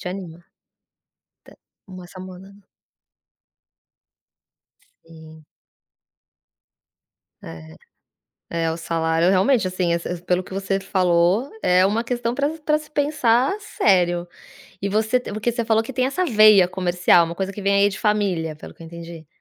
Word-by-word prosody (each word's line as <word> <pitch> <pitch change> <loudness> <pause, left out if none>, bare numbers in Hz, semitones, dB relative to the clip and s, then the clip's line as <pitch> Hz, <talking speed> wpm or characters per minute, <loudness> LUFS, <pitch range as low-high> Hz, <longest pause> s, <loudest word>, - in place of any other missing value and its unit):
te 180 - -5
anima, 180 -3 -7
te 170 - -31 1.4
uma 185 -2 -10
samona 185 +1 -12 2.5
E 160 -1 -15 2.0
É, 80 -1 -11 0.9
é, 160 - 0
o 165 - -5
salário 165 +1 0
realmente, 195 +3 +2
assim, 180 -2 -1
esse 170 0 -4
pelo 180 +1 0
que 190 - -12
você 195 0 -2
falou, 185 +5 +1
é 180 +1 +4
uma 220 +4 0
questão 240 -1 -2
pra 285 +1 0 0.2
pra 300 0 +3
se 305 - -12
pensar 285 -2 +1
sério. 175 - +1 0.5
E 200 - -2
você 220 +4 +1
porque 215 -1 -3
você 235 -1 -2
falou 220 -1 +2
que 245 +4 -8
tem 255 +1 0
essa 365 +7 -1
veia 215 - +6
comercial, 175 -2 +2
uma 170 +1 -6
coisa 195 +2 -4
que 205 - -8
vem 200 0 +1
aí 200 0 +4
de 195 - -7
família, 195 -7 -1
pelo - - -12
que - - -15
eu 165 - -10
entendi. 170 -1 -10
190 Hz, 140 wpm, -21 LUFS, 170-220 Hz, 2.5 s, veia